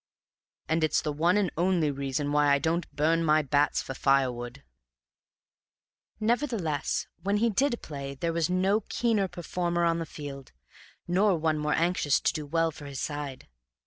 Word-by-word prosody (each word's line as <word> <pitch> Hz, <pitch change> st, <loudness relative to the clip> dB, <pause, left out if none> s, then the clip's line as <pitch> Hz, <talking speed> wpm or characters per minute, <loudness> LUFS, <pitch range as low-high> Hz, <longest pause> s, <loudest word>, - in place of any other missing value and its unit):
And 160 Hz, +1 st, +1 dB
it's 155 Hz, -, +2 dB
the 150 Hz, -, -2 dB
one 170 Hz, +6 st, +2 dB
and 195 Hz, -5 st, +1 dB
only 170 Hz, -3 st, +2 dB
reason 140 Hz, +1 st, -2 dB
why 145 Hz, -1 st, +3 dB
I 140 Hz, -, +5 dB
don't 160 Hz, +4 st, -1 dB
burn 165 Hz, +3 st, +1 dB
my 155 Hz, -1 st, +3 dB
bats 145 Hz, +1 st, +1 dB
for 135 Hz, -, -6 dB
firewood." 130 Hz, -1 st, 0 dB, 1.6 s
Nevertheless, 220 Hz, -, 0 dB, 0.2 s
when 200 Hz, +2 st, +1 dB
he 230 Hz, +2 st, +2 dB
did 240 Hz, +3 st, 0 dB
play 140 Hz, -2 st, -6 dB
there 165 Hz, +4 st, -2 dB
was 165 Hz, -1 st, 0 dB
no 190 Hz, +3 st, +2 dB
keener 220 Hz, -5 st, +1 dB
performer 175 Hz, 0 st, -2 dB
on 170 Hz, 0 st, +1 dB
the 165 Hz, -, -4 dB
field, 140 Hz, -3 st, -9 dB, 0.5 s
nor 185 Hz, +1 st, +3 dB
one 155 Hz, -1 st, 0 dB
more 150 Hz, 0 st, 0 dB
anxious 165 Hz, -4 st, +2 dB
to -, -, +1 dB
do 150 Hz, -2 st, -5 dB
well 165 Hz, +2 st, +1 dB
for 145 Hz, -1 st, -10 dB
his 140 Hz, -2 st, -6 dB
side. 145 Hz, -3 st, -5 dB
160 Hz, 165 wpm, -28 LUFS, 145-180 Hz, 1.6 s, I